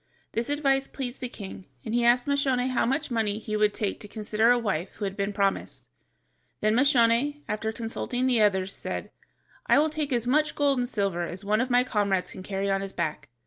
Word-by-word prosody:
This 230 Hz, +4 st, -2 dB
advice 275 Hz, -2 st, +1 dB
pleased 255 Hz, -2 st, -5 dB
the 250 Hz, -, -2 dB
king, 195 Hz, -4 st, -9 dB, 0.2 s
and 220 Hz, -, -3 dB
he 240 Hz, 0 st, +2 dB
asked 240 Hz, +1 st, +4 dB
Moscione 270 Hz, -3 st, +1 dB
how 255 Hz, -, +1 dB
much 270 Hz, +2 st, -1 dB
money 220 Hz, -3 st, 0 dB
he 215 Hz, -1 st, -4 dB
would 210 Hz, 0 st, +3 dB
take 205 Hz, -1 st, -2 dB
to 210 Hz, -, -8 dB
consider 215 Hz, +1 st, +1 dB
a 245 Hz, -, +5 dB
wife 195 Hz, -6 st, -2 dB
who 205 Hz, -, -4 dB
had 195 Hz, 0 st, -3 dB
been 200 Hz, 0 st, -1 dB
promised. 195 Hz, -, -2 dB, 0.7 s
Then 215 Hz, 0 st, +2 dB
Moscione, 265 Hz, +2 st, +3 dB
after 215 Hz, +1 st, -2 dB
consulting 235 Hz, +2 st, -3 dB
the 245 Hz, -4 st, +3 dB
others, 195 Hz, -2 st, +2 dB
said: -, -, -5 dB, 0.6 s
"I -, -, +5 dB
will 305 Hz, +2 st, +3 dB
take 300 Hz, -2 st, -2 dB
as 240 Hz, -2 st, +1 dB
much 300 Hz, +5 st, +2 dB
gold 280 Hz, -3 st, +2 dB
and 245 Hz, 0 st, -1 dB
silver 195 Hz, -7 st, -1 dB
as 190 Hz, +3 st, -7 dB
one 215 Hz, +2 st, +2 dB
of 255 Hz, -, -1 dB
my 245 Hz, 0 st, +4 dB
comrades 200 Hz, -6 st, 0 dB
can -, -, -9 dB
carry 195 Hz, +1 st, -3 dB
on 195 Hz, 0 st, +1 dB
his 195 Hz, 0 st, -5 dB
back." 150 Hz, -, -3 dB
230 Hz, 215 wpm, -27 LUFS, 200-255 Hz, 0.7 s, a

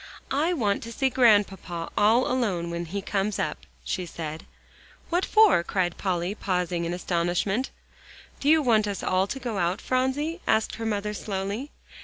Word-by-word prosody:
"I 305 Hz, +6 st, +2 dB
want 210 Hz, -, 0 dB
to 230 Hz, -, -7 dB
see 265 Hz, +2 st, 0 dB
Grandpapa 205 Hz, -8 st, +2 dB
all 225 Hz, +5 st, +4 dB
alone 195 Hz, -10 st, -1 dB
when 170 Hz, 0 st, -3 dB
he 195 Hz, +4 st, -4 dB
comes 200 Hz, +1 st, -1 dB
up," -, -, -3 dB, 0.2 s
she 180 Hz, -2 st, -2 dB
said. 160 Hz, -1 st, -6 dB, 0.6 s
"What 350 Hz, +2 st, +2 dB
for?" 430 Hz, -, +6 dB
cried 175 Hz, -1 st, -1 dB
Polly, 180 Hz, -1 st, -1 dB
pausing 180 Hz, -4 st, -1 dB
in 170 Hz, -, -2 dB
astonishment. 180 Hz, +7 st, 0 dB, 0.7 s
"Do 285 Hz, -, +1 dB
you 315 Hz, 0 st, +5 dB
want 220 Hz, -4 st, +3 dB
us 200 Hz, -2 st, -4 dB
all 185 Hz, +1 st, +2 dB
to 270 Hz, -, -4 dB
go 235 Hz, -5 st, -3 dB
out, 175 Hz, +2 st, 0 dB
Phronsie?" 280 Hz, +7 st, -1 dB
asked 220 Hz, 0 st, +1 dB
her 225 Hz, 0 st, -3 dB
mother 210 Hz, -1 st, -1 dB
slowly. 205 Hz, +6 st, -4 dB
205 Hz, 165 wpm, -26 LUFS, 180-250 Hz, 0.7 s, for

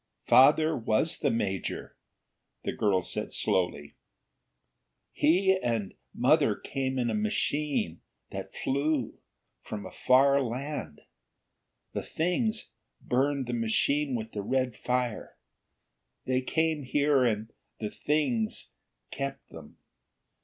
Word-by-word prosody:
"Father 155 Hz, +4 st, +6 dB
was 115 Hz, +7 st, 0 dB
the 140 Hz, -, +2 dB
major," 100 Hz, -6 st, -2 dB, 0.7 s
the -, -, -1 dB
girl 95 Hz, -4 st, +1 dB
said -, -, -4 dB
slowly. 90 Hz, -6 st, -1 dB, 1.2 s
"He 190 Hz, +5 st, +3 dB
and 115 Hz, -5 st, -1 dB, 0.2 s
mother -, -, +3 dB
came 130 Hz, -1 st, -3 dB
in 120 Hz, -2 st, +1 dB
a -, -, -2 dB
machine 150 Hz, -, -1 dB, 0.3 s
that -, -, -6 dB
flew, 140 Hz, -2 st, -1 dB, 0.4 s
from 105 Hz, -, -6 dB
a -, -, -8 dB
far 140 Hz, +2 st, +4 dB
land. 135 Hz, +4 st, -4 dB, 0.9 s
The -, -, -2 dB
Things 215 Hz, +7 st, -1 dB, 0.3 s
burned 135 Hz, +2 st, 0 dB
the 120 Hz, -, -4 dB
machine 130 Hz, +5 st, +1 dB
with 110 Hz, -1 st, -4 dB
the 105 Hz, -, -4 dB
red 130 Hz, +2 st, 0 dB
fire. 125 Hz, -2 st, -2 dB, 0.9 s
They 130 Hz, 0 st, +1 dB
came 160 Hz, +3 st, 0 dB
here 140 Hz, 0 st, +2 dB
and 110 Hz, -2 st, -1 dB, 0.3 s
the 105 Hz, -1 st, -3 dB
Things 135 Hz, -8 st, -1 dB, 0.4 s
kept 140 Hz, 0 st, -5 dB
them. 80 Hz, -3 st, -12 dB
130 Hz, 110 wpm, -29 LUFS, 115-150 Hz, 1.2 s, Father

